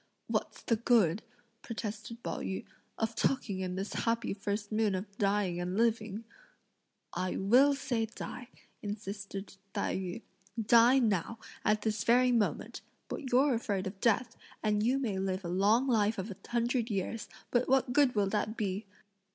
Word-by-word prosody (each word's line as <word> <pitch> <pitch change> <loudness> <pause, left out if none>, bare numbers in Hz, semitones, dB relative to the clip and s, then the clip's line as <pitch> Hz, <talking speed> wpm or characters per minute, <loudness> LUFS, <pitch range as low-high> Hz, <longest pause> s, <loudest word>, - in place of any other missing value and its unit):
"What's - - -2
the 230 - +2
good," 215 -6 +3 0.4
protested 225 +1 -6
Pao - - -3
yü, 190 - -4 0.3
"of 225 0 -1
talking 225 -5 0
in 185 -1 -3
this 195 +2 -4
happy 230 -1 0
first 205 +1 -3
moon 215 -2 +2
of 195 +2 -6
dying 195 -3 +1
and 180 +1 -2
of - - -2
living?" 225 -2 +1 0.9
"I 185 - -2
will 255 +9 +5
say 245 -5 -1
die," 245 +2 -7 0.3
insisted 200 -1 -6 0.2
Tai 200 - 0
yü, 185 +3 -4 0.4
"die 235 +4 +6
now, 225 -3 +1 0.3
at 215 0 +2
this 215 -1 0
very 250 +2 +5
moment! 230 -4 0 0.3
but 265 - -5
you're 265 +3 +5
afraid 210 -5 -1
of 195 +1 -6
death; 230 +1 +2 0.3
and 210 -1 +2
you 245 +5 +2
may 220 -8 -1
live 190 0 -2
a - - -3
long 205 +8 +3
life 220 -3 +2
of 195 +3 -4
a - - -6
hundred 240 0 0
years, 210 +2 -3 0.2
but 245 +1 +2
what 260 -1 +3
good 280 -4 +4
will 205 -2 +3
that 215 +2 -1
be!" 200 -1 -2
215 Hz, 165 wpm, -32 LUFS, 195-235 Hz, 0.9 s, die